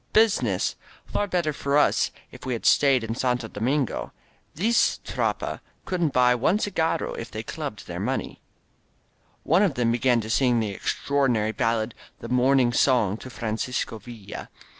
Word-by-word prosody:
"Business! 220 -1 +2 0.3
Far 205 - -1
better 175 -5 0
for 140 +1 0
us 150 - +3 0.2
if - - -13
we 130 - -2
had 115 - -5
stayed 135 -4 +4
in 115 0 -3
Santo 125 -1 -1
Domingo! 125 +5 -1 0.4
This 225 +8 +2
Tropa - - -2 0.3
couldn't 175 -5 0
buy 125 -1 +4
one 130 - +2
cigarro 175 -6 -1
if - - -6
they - - -6
clubbed - - -6
their - - -6
money!. - - -1
• - - -14
•" - - -20 1.1
One 170 +5 +3
of 190 -9 +2
them 120 -1 +1
began 120 +1 +2
to 110 - -7
sing 125 -2 +3
that 105 -2 -2
extraordinary 120 -2 0
bal 115 +2 +1
lad, 110 +1 -3 0.2
"The 115 - -9
Morning 125 -1 +3
Song 120 -6 +3
to 130 - -10
Francisco 115 0 -3
Villa." 110 -2 -9
125 Hz, 165 wpm, -25 LUFS, 115-145 Hz, 1.1 s, stayed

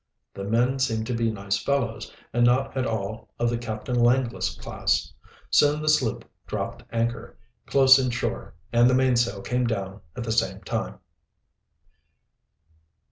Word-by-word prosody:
The 100 - -6
men 120 +5 +1
seemed 115 -4 0
to 125 - -3
be 115 -1 +1
nice 100 -2 -2
fellows, 130 -5 -1 0.2
and 120 - +2
not 130 +3 +2
at 130 -1 0
all 110 0 -4
of 120 0 +1
the 120 - -1
Captain 115 +1 -4
Langless 120 0 +1
class. - - -1 0.4
Soon 150 +1 +4
the 155 0 0
sloop 130 -7 +1 0.2
dropped - - -4
anchor 115 0 -2 0.3
close 135 -1 +7
in 130 -1 0
shore 120 - -3 0.2
and 120 +1 +5
the 130 - +3
mainsail 120 -5 +2
came 125 0 0
down 100 -3 -4
at 120 - -4
the 115 - -3
same 115 - 0
time. - - -3
120 Hz, 150 wpm, -25 LUFS, 110-130 Hz, 0.4 s, close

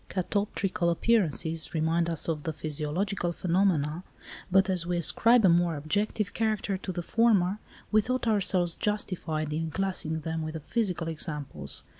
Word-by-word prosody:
Catoptrical 190 -1 -1
appearances 170 -5 +1
remind 165 +2 +1
us 165 -2 -2
of 160 -3 -1
the 160 +1 -3
physiological 155 +5 -2
phenomena, 170 -3 +1 0.5
but 195 +1 +5
as 185 -3 0
we 175 0 0
ascribe 225 +7 +4
a - - +7
more 170 -1 +3
objective 200 +6 -1
character 215 -3 0
to 190 0 -5
the 175 -1 -4
former, 210 -2 +2 0.3
we 215 0 +5
thought 255 +4 -2
ourselves 185 -5 +2
justified 170 -7 -2
in 160 +1 -2
classing 160 -3 -2
them 160 +1 -3
with 155 0 -5
the - - -3
physical 180 - -2
examples. 150 -3 -5
175 Hz, 150 wpm, -28 LUFS, 160-200 Hz, 0.5 s, a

